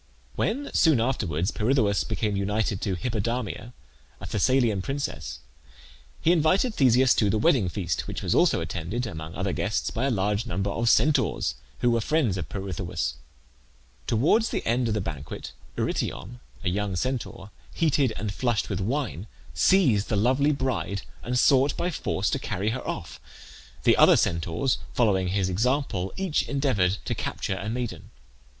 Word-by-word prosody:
When, 280 +6 -1
soon 155 -7 +4
afterwards, 100 - 0
Pirithoeus 110 -3 +1
became 110 -2 -1
united 100 0 -1
to 95 -3 -1
Hippodamia, 115 +2 -3 0.5
a - - -8
Thessalian 115 -2 +2
princess, 135 +8 -4 0.8
he 165 - +3
invited 180 - +3
Theseus 130 - +4
to 105 - +2
the 110 - +2
wedding 125 - +3
feast, 85 -4 -3
which - - -5
was - - +1
also - - +3
attended, 85 +9 -3
among 80 -6 -7
other 95 +1 -1
guests, 110 +1 -1
by 120 +4 -1
a - - +2
large 105 0 0
number 95 0 -1
of 115 +3 +1
Centaurs, 145 +2 +2 0.3
who 120 - +3
were 115 -1 +2
friends 145 - +1
of 80 -5 -5
Pirithoeus. 90 -8 -3 0.9
Towards 155 - +3
the - - -3
end 120 +1 +1
of 110 - 0
the 105 - 0
banquet 75 -5 -6 0.3
Eurytion, 120 +7 -3 0.2
a 90 - +1
young 100 +1 -1
Centaur, 115 -2 -3 0.2
heated 145 -6 +2
and 105 +1 -3
flushed 120 -3 -1
with - - -1
wine, 110 - -2 0.3
seized 130 - +3
the 110 - +1
lovely 130 +7 +3
bride 130 -8 -2 0.2
and 125 +1 -2
sought 135 +2 +4
by 180 - -1
force - - -1
to - - 0
carry 100 +4 -2
her 130 +2 -3
off. - - -5 0.6
The - - +5
other - - +7
Centaurs, 85 +10 0 0.2
following 95 -6 +2
his 95 0 0
example, 100 -1 0
each 190 -5 0
endeavoured 105 -10 +1
to - - -1
capture 95 - -3
a 100 +2 -4
maiden. 120 0 -4
110 Hz, 155 wpm, -26 LUFS, 95-130 Hz, 0.9 s, other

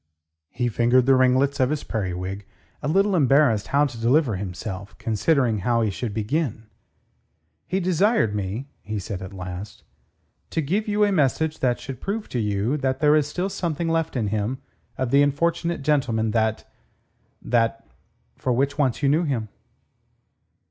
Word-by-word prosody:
He 125 0 -2
fingered 120 +2 +3
the 135 - +5
ringlets 130 +2 +3
of 130 -1 +3
his 150 -1 -2
periwig, 95 -1 -4 0.3
a 145 - -3
little 195 +5 +3
embarrassed 135 - +3
how 145 +1 +3
to 120 -5 -6
deliver 125 -1 +3
himself, 95 +1 -6
considering 115 +1 +1
how 115 +3 +1
he 110 - 0
should 115 +3 -4
begin. 110 +2 -2 1.0
"He 190 - 0
desired 185 - +2
me," 105 +5 -3 0.2
he 110 +1 -5
said 95 -1 -5
at 95 +1 -7
last, 95 +3 -7 0.7
"to - - -2
give 190 +9 -1
you 210 0 +2
a 205 - +3
message 160 -1 +1
that 125 -2 +1
should 135 -3 -8
prove 210 +2 -3
to 125 - -2
you 105 +5 0
that 130 -2 -1
there 150 0 +5
is 150 -2 +2
still 180 +5 -2
something 170 -4 -2
left 165 -2 0
in 110 -5 0
him 110 +5 -1 0.4
of 130 -2 -2
the 140 +1 +5
unfortunate 170 +3 0
gentleman 125 -7 +1
that... 110 -1 0 0.7
that.., 115 -1 0 0.5
for 130 - -2
which 140 +4 0
once 135 -1 +1
you - - +4
knew 155 +5 +3
him." 120 -7 -2
130 Hz, 160 wpm, -24 LUFS, 110-150 Hz, 1.0 s, the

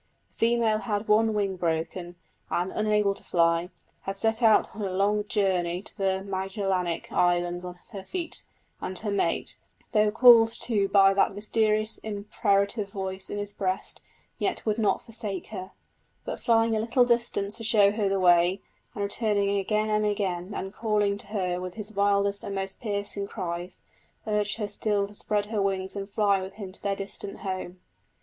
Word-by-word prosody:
The 230 - +2
female 230 -2 +2
had 210 -1 -2
one 220 +1 +4
wing 195 -2 0
broken, 175 +1 -2 0.3
and, 180 +2 -1
unable 210 -2 +2
to - - -12
fly, 170 0 +2 0.4
had 195 0 -3
set 225 +3 +1
out 220 -2 +4
on 215 - -6
her 195 - -1
long 205 +3 +1
journey 185 -4 0
to - - -7
the 190 -2 0
Magellanic 190 -2 -2
Islands 175 0 +1
on 180 0 -7
her 195 -3 -7
feet; 345 - -4 0.4
and 185 - -3
her 210 +1 -2
mate, 195 -4 -1 0.3
though 210 -1 +4
called 230 0 +7
to 205 -4 +1
by 195 -1 +5
that 195 0 +2
mysterious 215 +1 +1
imperative 200 0 0
voice 190 -1 -4
in - - -4
his 205 0 -4
breast, 190 -1 -3 0.4
yet - - -1
would 215 0 0
not 215 - +1
forsake 215 -5 -5
her; 190 -2 -7 0.5
but - - -4
flying 225 -1 +3
a - - +1
little 235 +3 +3
distance 235 -4 0
to 230 - -7
show 210 -3 +5
her 205 -2 0
the 195 0 +1
way, 175 +1 +4 0.4
and 205 - -2
returning 200 -1 +1
again 215 +2 0
and 210 0 +2
again, 195 -2 -2
and 190 +1 -5
calling 210 -2 0
to 200 - -7
her 180 -4 -2
with 185 -1 -6
his 215 -1 -6
wildest 200 0 +1
and 200 - -4
most 195 0 -4
piercing 200 -2 -2
cries, 175 -1 -5 0.4
urged 210 -1 0
her 210 -2 -2
still 205 0 0
to 205 - -14
spread 205 0 -1
her 210 -1 -2
wings 190 -1 -1
and 200 0 -5
fly 200 -1 +2
with 190 +1 -7
him 200 -3 -7
to 185 - -16
their 200 -1 0
distant 195 0 -6
home. 185 -2 -5
200 Hz, 180 wpm, -27 LUFS, 190-215 Hz, 0.5 s, called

